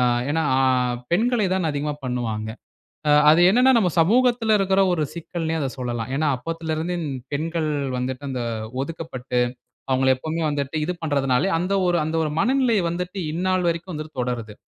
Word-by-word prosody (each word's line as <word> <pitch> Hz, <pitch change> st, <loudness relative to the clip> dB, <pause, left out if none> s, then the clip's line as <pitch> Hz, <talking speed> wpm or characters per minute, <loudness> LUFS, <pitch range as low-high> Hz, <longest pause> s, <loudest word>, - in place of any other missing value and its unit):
அ -, -, +3 dB, 0.3 s
ஏனா, 160 Hz, +2 st, +1 dB, 0.2 s
அ -, -, +3 dB, 0.5 s
பெண்களை 225 Hz, +3 st, +2 dB
தான் 185 Hz, -4 st, +1 dB
அதிகமா 145 Hz, +1 st, -2 dB
பண்ணுவாங்க, 115 Hz, -4 st, -2 dB, 0.6 s
அ -, -, +5 dB, 0.2 s
அது 165 Hz, +3 st, +6 dB
என்னனா, 250 Hz, +5 st, +5 dB
நம்ம 185 Hz, -5 st, +3 dB
சமூகத்தில 230 Hz, +3 st, +3 dB
இருக்கிற 195 Hz, 0 st, +3 dB
ஒரு 155 Hz, -3 st, 0 dB
சிக்கல்ன்னே 165 Hz, -1 st, -3 dB
அத 140 Hz, -, -1 dB
சொல்லலாம். 120 Hz, -1 st, -3 dB
ஏனா 155 Hz, +1 st, +1 dB
அப்போதிலிருந்து 165 Hz, +4 st, -3 dB, 0.4 s
பெண்கள் 160 Hz, +1 st, -1 dB, 0.3 s
வந்துட்டு 130 Hz, +2 st, -3 dB
அந்த 125 Hz, -2 st, -3 dB, 0.4 s
ஒதுக்கப்பட்டு, 135 Hz, -5 st, -4 dB, 0.5 s
அவங்கள 130 Hz, 0 st, +3 dB
எப்போமே 160 Hz, +4 st, -3 dB
வந்துட்டு 145 Hz, +1 st, -3 dB
இது 180 Hz, -, -1 dB
பண்றதுனாலே, 140 Hz, +1 st, +1 dB
அந்த 180 Hz, +3 st, -2 dB
ஒரு 175 Hz, -1 st, +2 dB
அந்த 160 Hz, +1 st, -2 dB
ஒரு 155 Hz, -, -1 dB
மனநிலை 250 Hz, -1 st, +2 dB
வந்துட்டு 180 Hz, +3 st, -4 dB
இந்நாள் 185 Hz, +1 st, 0 dB
வரைக்கும் 170 Hz, +2 st, -3 dB
வந்து 155 Hz, 0 st, -5 dB
தொடருது, 120 Hz, -4 st, -3 dB
160 Hz, 155 wpm, -23 LUFS, 135-180 Hz, 0.6 s, அது